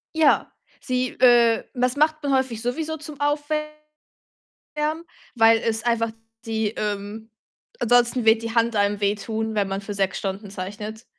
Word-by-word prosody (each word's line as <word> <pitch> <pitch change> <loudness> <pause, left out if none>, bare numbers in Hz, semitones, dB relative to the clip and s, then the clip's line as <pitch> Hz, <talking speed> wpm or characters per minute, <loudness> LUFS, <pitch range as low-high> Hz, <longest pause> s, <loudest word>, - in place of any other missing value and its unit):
Ja, 315 -2 +3 0.3
sie, 255 0 -1
äh 240 -2 +5
das 250 0 0
macht 310 +1 +2
man 285 -2 0
häufig 260 -4 0
sowieso 315 +7 -3
zum 300 -1 -10
Aufwärmen, 305 +1 -3 1.3
weil 225 -1 +5
es 225 -1 -1
einfach 230 -1 +1 0.4
die, 220 -1 0
ähm 210 +1 -5 0.5
ansonsten 245 0 +3
wird 220 +1 +4
die 230 0 -4
Hand 230 -1 +2
einem 205 0 +1
wehtun, 220 +2 -1
wenn 205 -2 0
man 195 0 -3
für 205 +1 -6
6 195 -1 -1
Stunden 195 +1 -5
zeichnet. 210 +4 -7
230 Hz, 145 wpm, -23 LUFS, 210-265 Hz, 1.3 s, äh